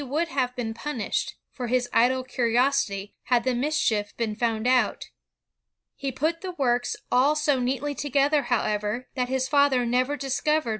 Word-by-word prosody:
would 305 +6 -1
have 255 -3 -1
been 230 -3 -3
punished... 235 -2 -3 0.2
for 250 -3 -5
his 250 +1 +1
idle 255 +3 +3
curi 245 -2 -1
osity, 240 -6 +1
had 245 -2 +2
the 255 - +1
mischief 240 -6 0
been 225 -2 -2
found 225 -1 -1
out. 255 0 +2 0.9
He 275 -1 -3
put 315 +6 -1
the 370 -1 -5
works 245 -3 +1 0.2
all 270 +5 +4
so 300 -3 +1
neatly 265 +3 -1
together, 285 +1 +1
however, 215 0 -1
that 250 -2 -1
his 260 0 0
father 280 -3 +3
never 255 +4 +1
dis 270 -1 -2
covered 305 -4 +1
255 Hz, 165 wpm, -25 LUFS, 240-280 Hz, 0.9 s, all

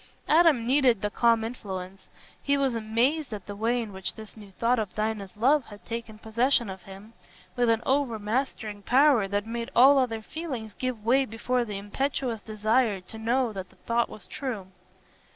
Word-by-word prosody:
Adam 310 -7 +5
needed 255 -5 +3
the 205 - 0
calm 230 -1 +3
influence; 195 -5 -6 0.3
he 280 0 +1
was 270 -3 +1
amazed 235 +7 0
at 200 - -10
the 205 - -7
way 230 +4 +1
in 220 -4 -5
which 190 -1 -4
this 220 -1 -11
new 210 -2 -12
thought 235 +4 +1
of 205 -4 -4
Dinah's 215 -2 -3
love 270 +5 +3
had 205 -1 -13
taken 230 -2 -6
possession 235 0 +1
of 190 -1 -9
him, 195 +4 -12 0.4
with 245 -2 +2
an 225 0 +2
overmastering 225 -4 -1
power 255 -2 +4
that 205 +1 -1
made 235 +1 -4
all 270 +3 +7
other 225 -4 -1
feelings 255 -8 -6
give 250 -3 -4
way 260 +4 +4
before 245 +1 -1
the 210 -3 -5
impetuous 235 +2 -2
desire 215 0 +1
to 220 +4 -10
know 235 +1 +1
that 190 -2 -6
the - - -23
thought 235 0 0
was 215 - -11
true. 220 -9 -5
230 Hz, 180 wpm, -27 LUFS, 210-255 Hz, 0.4 s, all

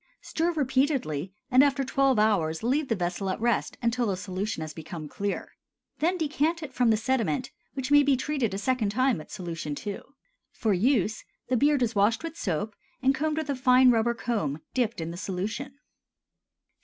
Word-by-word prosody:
Stir 335 +2 0
repeatedly, 260 - 0 0.2
and 255 +2 +7
after 280 -1 +2
twelve 270 -1 +2
hours 190 -7 +2
leave 275 +5 +1
the 225 - +1
vessel 180 +1 -2
at 185 - -2
rest 235 -1 0
until 235 0 +1
the 195 -2 -1
solution 190 -1 -3
has 155 -1 -5
become 160 -1 -7
clear. 200 +6 -4 0.5
Then 350 +4 +1
decant 320 +1 0
it 275 -3 -7
from 245 -2 +3
the 220 - +4
sediment, 225 - 0 0.2
which 265 0 -3
may 290 0 +8
be 280 -2 +3
treated 270 -4 -1
a - - -2
second 230 0 0
time 255 -1 +2
with 155 - -11
solution 165 -6 -5
II. 205 -1 -3 0.5
For 220 -3 +1
use, 215 +1 +1 0.3
the 255 - +2
beard 285 0 +3
is 230 -1 0
washed 215 +5 +2
with 330 -1 -5
soap, 205 - -2 0.3
and 265 +1 +4
combed 305 +3 -1
with 315 -2 -2
a - - -1
fine 255 0 +6
rubber 235 0 +2
comb 160 - -2
dipped 235 -7 0
in 165 +1 -4
the 170 - -7
solution. 205 +9 -4
235 Hz, 185 wpm, -27 LUFS, 195-270 Hz, 0.5 s, may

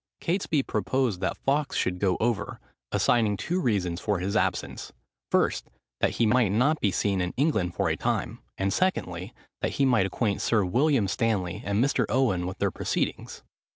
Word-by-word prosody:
Catesby 165 -5 0
proposed 110 -1 -1
that 95 - -1
Fawkes 145 +1 0
should 90 0 0
go 95 -2 +1
over, 110 -3 -1 0.3
assigning 110 -4 +2
two 180 - -1
reasons 95 - 0
for 105 -2 0
his 95 +4 -2
absence; 110 - -1 0.4
first, - - +1 0.3
that - - +1
he 115 - +2
might 115 -1 +3
not 140 +9 +2
be 100 - +2
seen 95 0 0
in 90 0 -3
England 110 - +1
for - - 0
a - - +1
time; - - -2 0.2
and 95 0 0
secondly, 95 - -1 0.3
that - - -1
he 140 - +2
might 115 -7 +3
acquaint 100 +1 -1
Sir 110 -4 +2
William 125 - +2
Stanley 100 -5 -1
and 100 +4 +1
Mr. 140 - +1
Owen 100 -9 +1
with 95 - -5
their - - 0
proceedings. - - -3
105 Hz, 175 wpm, -27 LUFS, 95-130 Hz, 0.4 s, might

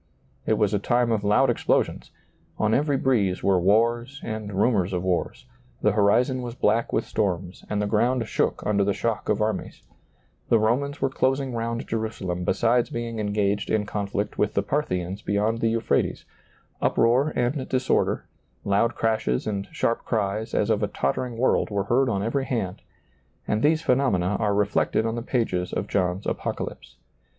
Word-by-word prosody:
It - - +3
was 105 -1 +1
a 105 - +2
time 120 +3 +1
of 110 -2 0
loud 120 +6 +4
explosions; - - 0 0.5
on 110 0 +1
every 145 +2 +2
breeze 105 -9 +1
were 95 -2 +3
wars 120 +7 +2
and 110 -2 -5
rumors 100 -2 +1
of 90 -1 -1
wars; 90 -2 -2 0.4
the 105 - +4
horizon 115 +6 +2
was 120 -1 -6
black 115 0 +1
with 110 - 0
storms 95 -3 -2
and 105 - -1
the 105 - 0
ground 115 +3 +1
shook - - -1
under 100 -1 +2
the 100 0 0
shock 115 +1 -2
of 105 0 +2
armies; 110 0 -3 0.7
the 115 - +5
Romans 130 +7 0
were 135 - +3
closing 135 0 0
round 115 0 -3
Jerusalem 110 -6 -3
besides 120 +5 +2
being 115 -1 -4
engaged 100 -1 0
in 110 -1 +1
conflict 100 0 -3
with 105 0 +1
the - - +2
Parthians 95 -9 -2
be 100 - -3
yond 110 +3 +1
the 115 - +2
Euphrates; 115 0 0 0.6
uproar 125 +6 +3
and 130 +2 -1
disorder, 130 0 +1 0.4
loud 105 +4 +1
crashes 110 - 0
and 100 -2 -3
sharp 115 - -1
cries 110 -1 -2
as - - +2
of - - +1
a - - +1
tottering 115 - -2
world 130 - +2
were 100 -2 -1
heard 125 +6 +2
on 100 -3 -1
every 130 +5 -1
hand; 100 -9 -3 0.7
and 105 +1 0
these 160 +3 +3
phenomena 105 -8 +2
are 105 -3 +1
reflected 105 +2 +1
on 115 - -1
the 120 - -3
pages 115 -8 -1
of - - -2
John's 90 +2 -1
Apocalypse. - - -4
110 Hz, 170 wpm, -25 LUFS, 100-120 Hz, 0.7 s, the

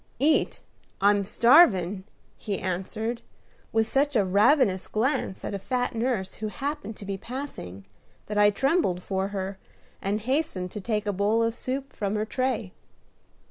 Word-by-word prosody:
"Eat! 300 +5 +2 0.4
I'm 200 0 +4
starvin'!" 200 - +5 0.3
he 205 -3 -3
answered, 215 +6 -3 0.5
with 225 0 +2
such 275 +4 +1
a 205 -4 +4
ravenous 200 +1 +3
glance 220 -4 -1
at - - -4
a 200 - -3
fat 250 +4 -1
nurse 230 -5 -1
who 215 - -3
happened 270 -1 -4
to 200 - -9
be 195 0 -3
passing, 230 - -7 0.4
that 210 - -5
I 205 0 +6
trembled 240 - +1
for 190 0 -1
her, 195 -1 -4 0.4
and 200 +2 -1
hastened 255 - -1
to 210 - -6
take 210 0 -1
a 205 - 0
bowl 210 +4 +2
of 230 0 +1
soup 265 +3 -4
from 200 0 -2
her 210 0 0
tray. 235 -5 -2
215 Hz, 155 wpm, -26 LUFS, 195-255 Hz, 0.5 s, I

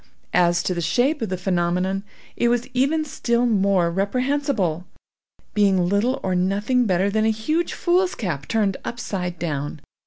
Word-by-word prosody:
As 175 0 +3
to 185 - 0
the 175 - -3
shape 265 - +1
of 225 - -2
the 185 - -2
phenomenon, 180 +1 0 0.3
it 240 - +1
was 240 +1 +1
even 285 +5 +1
still 240 -4 0
more 195 -6 +2
reprehensible. 200 - -1 0.7
Being 195 -4 +3
little 225 +8 +1
or 185 - 0
nothing 205 +7 +1
better 190 +1 +1
than 215 +1 +1
a - - +3
huge 270 +11 -1
foolscap 345 - 0
turned 210 -4 +1
upside 185 -7 -4
down. 150 -2 -3
200 Hz, 150 wpm, -22 LUFS, 180-245 Hz, 0.7 s, As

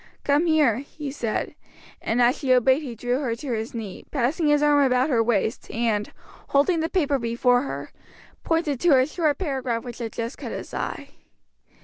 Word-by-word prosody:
"Come 290 +4 +2
here," 300 -9 +3
he 285 +1 -7
said, 235 -6 -3 0.5
and 240 +2 +1
as 245 +3 +4
she 265 -3 0
obeyed 260 +3 +4
he 255 -6 -6
drew 245 +3 -1
her 245 -6 -1
to 255 +3 -6
his 225 +2 -4
knee, 210 -5 -6
passing 295 +4 0
his 295 0 +3
arm 290 -1 +5
about 260 +2 +2
her 235 -3 +3
waist, 225 0 -1
and, 220 -2 -1 0.4
holding 310 +5 +2
the 320 +1 -1
paper 290 -7 +1
before 245 +1 +2
her, 275 - -6 0.5
pointed 325 -5 0
to 310 -4 +5
a 255 - +4
short 305 0 0
paragraph 260 -9 -2
which 245 -2 -8
had 230 -2 -4
just 230 0 -5
caught - - -6
his - - -7
eye. - - -4
260 Hz, 190 wpm, -24 LUFS, 235-295 Hz, 0.5 s, arm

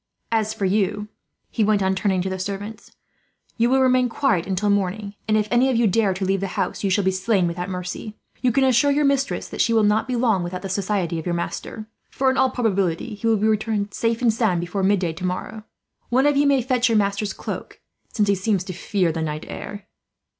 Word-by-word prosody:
"As 220 -1 +1
for 220 -3 -3
you," 205 +2 0 0.4
he 225 - +1
went 205 -1 +2
on, 190 0 +2
turning 190 -2 0
to - - -3
the 190 0 -4
servants, 200 +3 -6 0.6
"you 235 +1 +3
will 265 +1 +4
remain 255 -1 +3
quiet 230 - 0
until 195 +2 0
morning; 200 +1 -1
and 215 0 +3
if 210 -1 0
any 245 +2 +4
of 260 - +1
you 235 0 +3
dare 200 -1 +2
to 190 +1 -2
leave 195 +1 +1
the 195 - -2
house, - - -2
you 200 - +1
will 205 - +1
be 190 - +2
slain 190 0 +1
without 175 +2 -3
mercy. 180 +3 -5 0.3
You 250 -1 +3
can 270 +3 +2
assure 260 +2 +4
your 290 +1 +2
mistress 275 0 0
that - - -2
she 230 - +2
will 220 -1 +4
not 210 +4 +2
be 255 - -1
long 230 -6 +2
without 180 +2 -5
the 195 - -4
society 190 -3 -1
of 160 - -7
your 175 - 0
master; 195 +5 -5 0.2
for 265 -1 +1
in 260 - -2
all 265 - +4
probability 200 -9 -1
he 210 +3 -3
will 225 -1 +3
be 210 - 0
returned, 215 -1 0
safe 230 +1 -1
and 230 -2 +4
sound, 215 -6 +1
before 175 +3 -3
midday 190 -4 +1
tomorrow. 185 +5 -5 0.4
One 260 +3 +3
of 290 0 +3
you 285 +1 +3
may 275 -3 +3
fetch 250 -1 +1
your 225 - +3
master's 200 0 0
cloak, - - -7 0.3
since 210 -2 +1
he 200 - +4
seems 195 -1 0
to 185 - -6
fear 180 0 0
the 160 0 -3
night 155 0 -4
air." 205 -1 -7
210 Hz, 230 wpm, -22 LUFS, 190-230 Hz, 0.6 s, will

